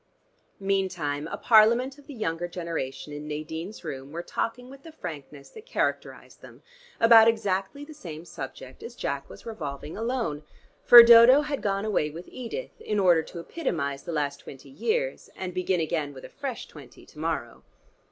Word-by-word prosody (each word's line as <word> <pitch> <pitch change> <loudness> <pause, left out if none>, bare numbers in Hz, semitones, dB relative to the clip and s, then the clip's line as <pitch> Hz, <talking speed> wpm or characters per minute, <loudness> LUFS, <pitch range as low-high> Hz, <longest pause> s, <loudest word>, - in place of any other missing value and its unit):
Meantime 180 -7 -1
a - - -5
parliament 235 +5 +4
of 285 - -19
the 290 - -8
younger 175 -5 -2
generation 165 -5 -5
in 150 +1 -7
Nadine's 160 +6 -6
room 135 -3 -7
were 170 +2 -5
talking 245 +6 -3
with 270 +1 -13
the 325 - -12
frankness 150 - -9
that 440 +2 -13
characterized - - -3
them - - -15 0.4
about 230 -1 +8
exactly 220 +4 -1
the 310 - -11
same 165 - -9
subject 135 -4 -9
as 235 - -9
Jack 140 - -4
was - - -13
revolving 155 -9 -6
alone, 225 - -2 0.4
for 240 -1 +11
Dodo 235 +4 +8
had 295 -1 -3
gone 200 0 -1
away 190 -8 0
with 165 +4 -10
Edith 255 - -7
in 210 - -1
order 175 -4 +5
to 165 - -11
epitomize 150 - -3
the 170 - -7
last 145 -3 -1
twenty 135 0 -12
years, 485 - -2
and 185 -1 -5
begin 185 0 0
again 155 -3 -2
with 130 - -10
a - - -10
fresh 270 -5 -6
twenty 140 -5 -14
to 150 - -16
morrow. 155 -7 -3
180 Hz, 170 wpm, -26 LUFS, 150-235 Hz, 0.4 s, for